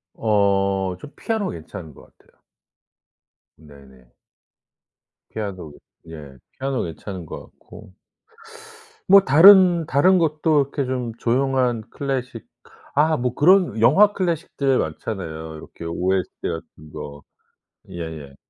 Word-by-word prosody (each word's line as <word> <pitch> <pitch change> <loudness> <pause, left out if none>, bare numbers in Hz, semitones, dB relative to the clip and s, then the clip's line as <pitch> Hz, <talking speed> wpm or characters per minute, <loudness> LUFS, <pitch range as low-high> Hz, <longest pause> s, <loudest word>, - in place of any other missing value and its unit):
어 100 -3 0
전 150 - -12
피아노 220 -3 -2
괜찮은 80 -1 -9
것 - - -19
같아요. - - -30 1.2
네네. 70 -5 -18 1.2
피아노 95 -8 -6 0.3
예 75 -4 -11 0.2
피아노 135 0 -2
괜찮은 90 +2 -7
것 - - -8
같고. 105 -3 -16 1.2
뭐 200 +1 +8
다른 175 +2 +6
다른 180 +8 +3
것도 155 -2 +2
이렇게 140 +1 -4
좀 125 -2 -3
조용한 125 -1 0
클래식 130 -5 -5 0.5
아 155 +2 +3
뭐 125 0 -2
그런 175 - +3
영화 190 - +5
클래식들 165 -8 -1
많잖아요. 90 +4 -4 0.3
요렇게 80 - -12
OST 90 +2 -1 0.2
같은 80 -2 -9
거. 70 0 -9 0.7
예예. 80 -5 -8
115 Hz, 225 characters per minute, -21 LUFS, -, 1.2 s, 뭐